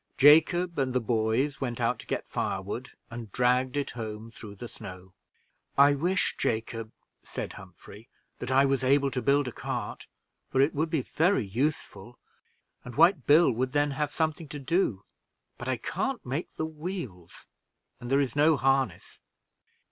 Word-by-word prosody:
Jacob 160 +4 +5
and 130 -2 0
the 125 - +2
boys 115 +5 0
went 120 -3 -3
out 120 +1 0
to - - -12
get - - -3
firewood, 100 +6 -3 0.2
and 115 -3 -7
dragged 125 +3 +2
it 140 -1 -1
home 110 -1 -6
through 105 -3 -10
the 120 +5 -8
snow. 95 -4 -11 0.6
"I 140 +1 +7
wish, 175 +6 0
Jacob," 115 0 -2 0.3
said - - -6
Humphrey, 110 +4 -13 0.3
"that 125 - -5
I 135 +1 +5
was 135 -1 +1
able 140 +1 +3
to 125 - -2
build 140 0 +2
a - - -3
cart, - - -5 0.4
for 130 - 0
it 140 +3 +4
would 155 +3 0
be 155 -5 0
very 160 - +1
useful, 120 -1 -3 0.7
and 125 -1 -9
White 170 -4 +4
Billy 150 0 +6
would 130 +3 -2
then 145 0 +2
have 150 +1 -2
something 160 0 -1
to 145 +1 -7
do; 135 - 0 0.5
but 120 - -6
I 130 - 0
can't 240 - -3
make 135 +7 -4
the 160 - -2
wheels, 155 - -7 0.5
and 120 - -7
there 135 +1 +3
is 135 -3 -1
no 150 +1 +4
harness." 135 0 0
135 Hz, 165 wpm, -28 LUFS, 115-150 Hz, 0.7 s, I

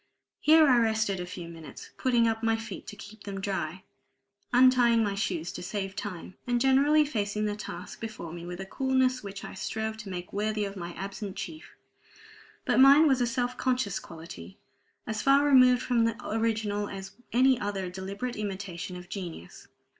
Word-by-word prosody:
Here 315 0 +6
I 250 -3 +5
rested 220 -4 +1
a 180 - -5
few 175 -1 -7
minutes, 165 -2 -10
putting 240 -3 +2
up 225 0 -1
my 225 0 +2
feet 225 0 -8
to - - -7
keep 210 +1 -12
them 195 -1 -5
dry, 190 -3 -3 0.7
untying 245 -2 +5
my 205 -2 0
shoes 175 -5 -2
to - - -7
save 195 +1 -4
time, 205 -4 -6
and 245 0 +2
generally 280 +4 +4
facing 210 -6 -1
the 210 -1 -1
task 210 - -8
before 215 -7 -6
me 170 -1 -7
with 175 +1 -7
a 190 - -5
coolness 260 +3 +1
which 200 -1 -8
I - - -8
strove 220 +3 -3
to 210 -2 -8
make 180 -1 -6
worthy 210 +1 0
of 200 0 -6
my 175 -2 -6
absent 195 +2 -6
chief. 315 0 -8 0.9
But - - +2
mine 280 +4 +8
was 265 -3 +3
a 240 - +2
self 245 +1 -1
conscious 250 -7 0
quality, 160 - -10 0.5
as 220 0 -3
far 275 +1 +5
removed 255 -3 +6
from 235 -2 +2
the 230 0 -1
original 215 -2 -1
as 195 -1 -7 0.2
any 255 +1 +4
other 200 -3 -3
deliberate 200 +6 -5
imitation 195 -4 -5
of 180 0 -9
genius. 175 - -8
210 Hz, 180 wpm, -28 LUFS, 190-245 Hz, 0.9 s, mine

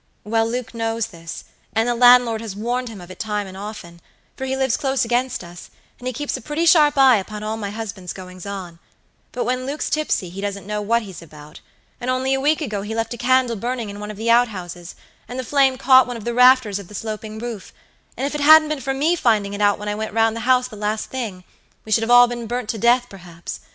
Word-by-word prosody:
Well, 225 +1 0
Luke 245 0 -4
knows 225 -1 -1
this; 165 -2 -9 0.3
and 225 +1 +1
the 240 - +2
landlord 245 -2 +5
has 220 -4 -6
warned 240 +4 -2
him 215 -3 -9
of 175 0 -11
it - - -12
times 210 -2 -2
and 190 - -10
often, 190 -4 -9 0.3
for 265 - -5
he 265 0 -2
lives 265 -3 +1
close 270 -3 0
against 245 +2 -1
us, 175 0 -11 0.3
and 250 - -6
he - - 0
keeps 290 +4 -3
a 260 - -6
pretty 300 +7 -2
sharp 300 -4 +5
eye 265 -3 +7
upon 210 +2 -6
all 215 +1 -2
my 210 -2 -4
husband's 200 -4 -6
goings 185 0 -10
on; 185 -4 -7 0.5
but 245 - -2
when 255 +2 -2
Luke's 290 +2 -3
tipsy 305 - -1
he 195 +2 -7
doesn't 200 -2 -4
know 210 +1 -3
what 230 +3 +1
he's 190 -5 -10
about, 150 -1 -13 0.4
and 245 - -4
only 260 +1 +1
a 270 - 0
week 300 +3 +2
ago 215 -9 -3
he 215 +2 -5
left 225 +1 -2
a - - -7
candle 255 -1 +2
burning 235 0 -3
in 205 - -9
one 210 0 -6
of 210 - -7
the 230 +2 0
out 240 +1 +5
houses, 175 -4 -8 0.3
and 250 - -7
the 260 - -3
flame 270 0 +2
caught 260 -1 +6
one 245 -1 -5
of 220 - -10
the 240 - -1
rafters 250 -4 +5
of 200 - -10
the 210 - -12
sloping 215 0 -5
roof, 225 -3 -7 0.5
and 270 - -2
if 285 - -3
it 295 - -3
hadn't 310 +1 +7
been 305 -3 -3
for 270 0 -2
me 310 +6 +2
finding 215 -9 +1
it 205 - -4
out 205 0 +3
when 210 - -7
I 210 - -1
went 215 0 -4
round 225 0 +3
the - - -4
house 255 -1 +4
the 235 - -11
last 210 +1 -3
thing, 220 -8 -5 0.4
we 220 - -9
should 225 - +4
have 225 - -2
all 245 0 +8
been 240 -1 -5
burnt 245 -1 -3
to 225 - -2
death, 240 +3 +4
perhaps. 175 -5 -9
225 Hz, 255 wpm, -21 LUFS, 205-255 Hz, 0.5 s, all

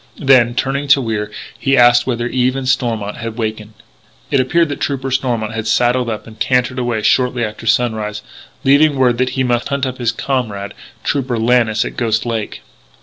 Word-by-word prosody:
Then, 130 -5 +4
turning 135 +3 -1
to 140 0 +5
Wier, 110 -4 -3 0.3
he 135 0 +2
asked 120 0 +5
whether 120 -2 -1
Eve 125 +1 0
and 135 -1 -4
Stormont 115 -5 -1
had 115 -1 -5
awakened. 110 -1 -4 0.6
It 140 - +3
appeared 160 +6 +2
that 145 - -4
Trooper 135 -1 -2
Stormont 120 -4 -1
had 110 -1 -4
saddled 120 +1 +2
up 110 -2 -5
and 110 -1 -14
cantered 125 +2 +1
away 120 -3 -2
shortly 125 -1 +2
after 110 +1 -8
sunrise, 110 -3 0 0.4
leaving 145 +2 +4
word 125 -3 +2
that 130 0 +1
he 130 - +2
must 120 -1 0
hunt 140 -1 -1
up 130 0 -5
his 120 -2 +1
comrade, 115 -6 -3 0.3
Trooper 130 -4 -1
Lannis, 115 -1 +2
at - - -7
Ghost 115 -2 0
Lake. 115 -3 -4
120 Hz, 185 wpm, -17 LUFS, 110-130 Hz, 0.6 s, to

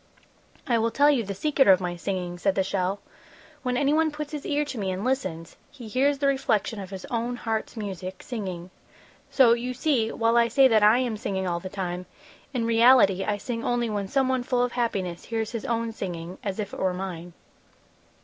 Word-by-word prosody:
"I 235 -2 +2
will 230 +1 +1
tell 285 +6 +4
you 260 -5 +1
the 200 -1 -5
secret 285 +5 +2
of 190 -2 +7
my 180 -1 -3
singing," 175 -1 -4
said 195 +1 +1
the 190 - +2
shell. 190 +1 -1 0.6
"When 250 -1 -1
anyone 300 +4 +3
puts 300 0 -6
his 300 -2 -5
ear 295 0 +1
to 265 -5 -6
me 195 -2 -2
and 185 +2 -3
listens, 185 -11 -2
he 255 -6 -11
hears 275 +6 +2
the 280 - -1
reflection 245 -5 +1
of 190 -2 -7
his 190 -1 -7
own 240 +1 -1
heart's 225 -1 -3
music, 190 -3 -6
singing; 185 -7 -5 0.6
so, 250 -4 +5
you 245 +2 -3
see, 250 -5 +1
while 230 +1 +2
I 235 0 +5
say 265 +4 +5
that 220 -4 +4
I 210 +3 +6
am 245 -4 -1
singing 195 -5 -2
all 170 -1 -1
the 185 - -7
time, 180 -2 -4 0.4
in 245 -4 -1
reality 230 -4 +5
I 210 -1 -1
sing 230 +2 -4
only 240 -2 0
when 205 -2 -2
someone 260 +1 +1
full 245 0 0
of 245 - -1
happiness 195 -8 -2
hears 225 -1 -3
his 230 -3 -5
own 230 -1 -1
singing 180 -4 -6
as 195 -2 -3
if 205 -2 -4
it - - -7
were 185 -1 0
mine." 175 -2 -6
225 Hz, 205 wpm, -26 LUFS, 190-250 Hz, 0.6 s, of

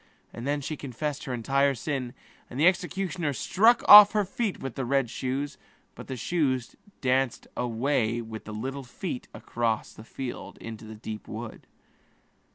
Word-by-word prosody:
And 120 +3 -6
then 145 0 0
she 155 +3 -4
confessed 145 +2 -5
all 130 - -2
her 135 +4 +2
sin, 130 -1 -4 0.3
and 125 - -6
the 155 - +4
executioner 180 -3 +1
struck 220 - +3
off 210 0 +11
her 210 -2 +2
feet 215 +1 -2
with 135 -2 -5
the 135 - -3
red 130 -1 +1
shoes; 135 +2 -3 0.3
but - - -11
the 130 - -5
shoes 130 -5 -1 0.3
danced 130 -1 +1
away 120 -1 0
with 110 -1 -7
the 105 - -7
little 135 +6 -4
feet 125 +2 -6
across 115 -2 -2
the 110 - -12
field 125 +2 -7
into 115 -1 -8
the 110 0 -9
deep 110 0 -7
forest. 110 +1 -8
135 Hz, 165 wpm, -27 LUFS, 120-150 Hz, 0.3 s, off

